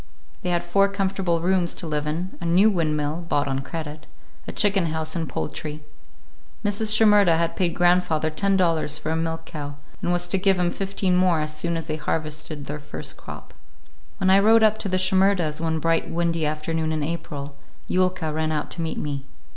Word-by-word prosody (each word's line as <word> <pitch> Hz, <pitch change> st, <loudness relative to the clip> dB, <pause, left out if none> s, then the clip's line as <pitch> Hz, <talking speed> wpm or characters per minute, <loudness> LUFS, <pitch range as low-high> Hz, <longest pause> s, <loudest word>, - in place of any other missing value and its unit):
They 180 Hz, -, -2 dB
had 175 Hz, -1 st, +1 dB
four 195 Hz, +3 st, +3 dB
comfortable 190 Hz, -4 st, -1 dB
rooms 180 Hz, -1 st, +1 dB
to -, -, -4 dB
live 150 Hz, -1 st, -2 dB
in, 170 Hz, +5 st, -3 dB
a -, -, -4 dB
new 185 Hz, +6 st, +5 dB
windmill,—bought 155 Hz, -2 st, -1 dB
on 135 Hz, -1 st, -1 dB
credit,—a 155 Hz, +2 st, -9 dB
chicken 195 Hz, -4 st, +3 dB
house 160 Hz, 0 st, -2 dB
and 165 Hz, -4 st, -2 dB
poultry. 150 Hz, -, -5 dB, 0.8 s
Mrs. 205 Hz, +1 st, +1 dB
Shimerda 210 Hz, -6 st, +5 dB
had 170 Hz, 0 st, 0 dB
paid 175 Hz, -2 st, 0 dB
grandfather 175 Hz, -3 st, +2 dB
ten 195 Hz, +5 st, +1 dB
dollars 165 Hz, -4 st, +1 dB
for 155 Hz, -, -3 dB
a -, -, 0 dB
milk 165 Hz, 0 st, -2 dB
cow, 145 Hz, -2 st, -6 dB, 0.3 s
and 175 Hz, -, 0 dB
was 175 Hz, 0 st, +2 dB
to 190 Hz, -, +1 dB
give 190 Hz, 0 st, +3 dB
him 175 Hz, -1 st, +1 dB
fifteen 195 Hz, -1 st, -1 dB
more 180 Hz, -3 st, +3 dB
as 155 Hz, 0 st, -2 dB
soon 170 Hz, +2 st, -1 dB
as 165 Hz, -, -4 dB
they 155 Hz, -1 st, -3 dB
harvested 155 Hz, -1 st, -3 dB
their 150 Hz, +1 st, -5 dB
first 145 Hz, -, -6 dB
crop. -, -, -10 dB, 0.6 s
When 190 Hz, 0 st, +2 dB
I 195 Hz, -, +7 dB
rode 220 Hz, +2 st, +5 dB
up 215 Hz, 0 st, +4 dB
to 200 Hz, -, -2 dB
the 185 Hz, -, +1 dB
Shimerdas' 185 Hz, -4 st, +2 dB
one 160 Hz, -1 st, 0 dB
bright 165 Hz, +1 st, 0 dB
windy 165 Hz, -2 st, 0 dB
afternoon 155 Hz, +1 st, -2 dB
in 155 Hz, -1 st, -1 dB
April, 145 Hz, -3 st, -5 dB, 0.3 s
Yulka 185 Hz, -4 st, 0 dB
ran 155 Hz, 0 st, -1 dB
out 150 Hz, -1 st, -2 dB
to -, -, -4 dB
meet 160 Hz, -1 st, -3 dB
me. 140 Hz, -2 st, -4 dB
165 Hz, 190 wpm, -24 LUFS, 155-185 Hz, 0.8 s, I